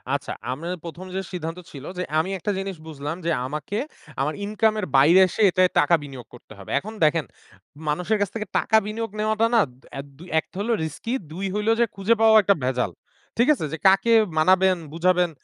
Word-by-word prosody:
আচ্ছা, 140 - -4 0.2
আমি 145 +6 -6 0.2
১ম 170 +2 -8
যে 190 - -1
সিদ্ধান্ত 165 0 -5
ছিল 140 -1 -10
যে 180 - -1 0.2
আমি 165 +4 -1
একটা 200 +3 -2
জিনিস 195 0 -4
বুঝলাম 150 0 -5
যে 170 - +1
আমাকে 150 +9 -4 0.4
আমার 150 +3 0
ইনকাম 215 +1 +1
এর 205 - -2
বাইরে 160 +7 +6
এসে 200 - -4
এটায় 185 0 +3
টাকা 170 +3 +4
বিনিয়োগ 135 -4 -10
করতে 120 -2 -14
হবে। 95 - -12
এখন 215 +8 -9
দেখেন, 155 0 +3 0.6
মানুষের 180 +8 0
কাছ 205 - +1
থেকে 215 -2 -4
টাকা 220 - +3
বিনিয়োগ 220 +1 -4
নেওয়াটা 215 +1 +2
না 230 - +6
দ - - -19 0.3
এদ 140 - -7 0.3
১ - - -6
হলো 220 +4 -1
রিস্কি, 160 - -4 0.2
২ 185 +5 -4
হইলো 210 +2 +1
যে 235 - +5
খুঁজে 200 +4 +2
পাওয়াও 220 -1 +7
একটা 200 +1 +4
ভেজাল। 125 -6 0 0.5
ঠিক 235 +3 +3
আছে? 215 - -4
যে - - -2
কাকে 195 +4 +4 0.2
মানাবেন 185 +3 +4 0.2
বুঝাবেন? 180 +1 +2
185 Hz, 195 wpm, -23 LUFS, 155-210 Hz, 0.6 s, পাওয়াও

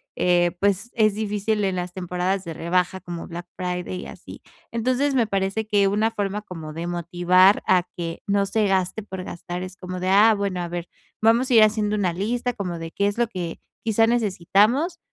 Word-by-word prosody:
eh, 175 -1 +3
pues 200 +4 0
es 215 -3 +3
difícil 210 0 -1
en 190 -1 0
las 180 0 -3
temporadas 180 +1 -2
de 165 - -5
rebaja 180 +3 0
como 175 -2 -7
Black 175 +1 -7
Friday 180 0 -3
y - - -8
así. - - -11 0.3
Entonces, 255 +4 0
me 240 -3 +3
parece 195 +2 -1
que 205 -2 +3
una 210 +3 +1
forma 205 -1 -2
como 165 -6 -8
de 165 +2 -5
motivar 175 +3 +3
a 180 -1 +4
que 165 -1 -5
no 200 0 +2
se 210 +1 +1
gaste 190 +2 0
por 190 -3 -7
gastar 175 0 -6
es 185 0 -8
como 185 0 -6
de: 185 - 0
"Ah, 210 +4 +6
bueno, 200 -3 -2
a 175 - -3
ver, 175 0 -5 0.3
vamos 230 +4 +4
a - - +2
ir 220 - +9
haciendo 215 -1 +2
una 195 -4 +1
lista 240 +7 -1
como 185 -6 -4
de 165 0 -6
qué 200 - 0
es 205 - -2
lo 240 0 +2
que 180 -6 -5 0.2
quizá 225 0 +3
necesitamos, 230 - +2
195 Hz, 200 wpm, -23 LUFS, 180-215 Hz, 0.3 s, ir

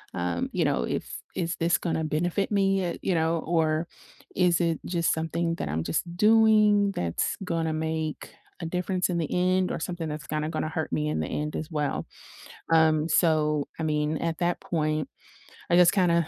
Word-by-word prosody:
um, 85 -1 -2
you - - 0
know, - - +1
if - - -4
"Is 170 -1 -1
this 170 +1 +2
gonna 160 -2 -2
benefit 175 +7 -1
me," 195 -1 +2
eh, 175 -1 -3
you 190 - +1
know, 165 0 +1
or 160 0 0 0.5
"Is 180 -2 +3
it 165 -2 0
just 170 -2 +1
something 165 +1 -1
that 75 - -4
I'm 80 +2 -1
just 160 - -1
doing 210 -1 +5
that's 85 -1 -1
gonna 165 -3 -1
make 160 -1 -3 0.3
a 165 - -3
difference 180 +2 -1
in 175 - 0
the 160 - -1
end 185 +1 +2
or - - -3
something 175 -2 -4
that's 150 0 -5
kinda 155 0 -2
gonna 155 -1 -2
hurt 160 0 -3
me 150 0 0
in - - -1
the - - -2
end 150 0 -3
as 155 - -4
well?" 150 -4 -2 0.7
Um, 160 -1 +4
so, 150 -3 +2
I - - -2
mean, 150 0 0
at 165 -1 -2
that 175 0 0
point, 155 -2 -1 0.6
I - - +5
just 180 0 +6
kinda 170 -4 +3
165 Hz, 190 wpm, -27 LUFS, 155-180 Hz, 0.7 s, just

